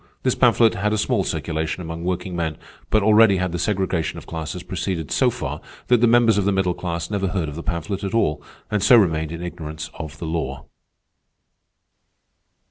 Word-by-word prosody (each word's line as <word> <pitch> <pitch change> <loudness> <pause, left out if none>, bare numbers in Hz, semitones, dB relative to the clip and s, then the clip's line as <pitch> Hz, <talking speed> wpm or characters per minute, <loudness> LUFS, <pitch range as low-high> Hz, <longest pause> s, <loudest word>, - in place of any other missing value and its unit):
This - - +2
pamphlet 115 -2 +4
had 105 +2 0
a - - +1
small 105 -1 +1
circulation 80 +2 -3
among 85 0 -6
workingmen; 85 -3 -2 0.3
but 110 -2 +3
already 105 -1 +6
had 90 -1 -1
the 85 - -3
segregation 95 -5 -1
of - - -9
classes 80 +2 -5
proceeded 90 -4 -3
so - - +3
far, - - -5 0.3
that 120 -2 +4
the 120 - +5
members 115 -3 +4
of 100 - 0
the 100 - +3
middle 95 -2 +1
class 85 0 -4
never 100 -2 0
heard 90 -3 -1
of 75 - -5
the 85 - -5
pamphlet 95 +3 -3
at 100 +3 -2
all, 75 -9 +1 0.3
and 105 -1 +1
so 125 +5 +7
remained 80 -6 +2
in 85 +1 -6
ignorance 80 -3 -6
of 75 -2 -8
the 85 - -6
law. 70 -4 -3
90 Hz, 190 wpm, -22 LUFS, 80-100 Hz, 0.3 s, so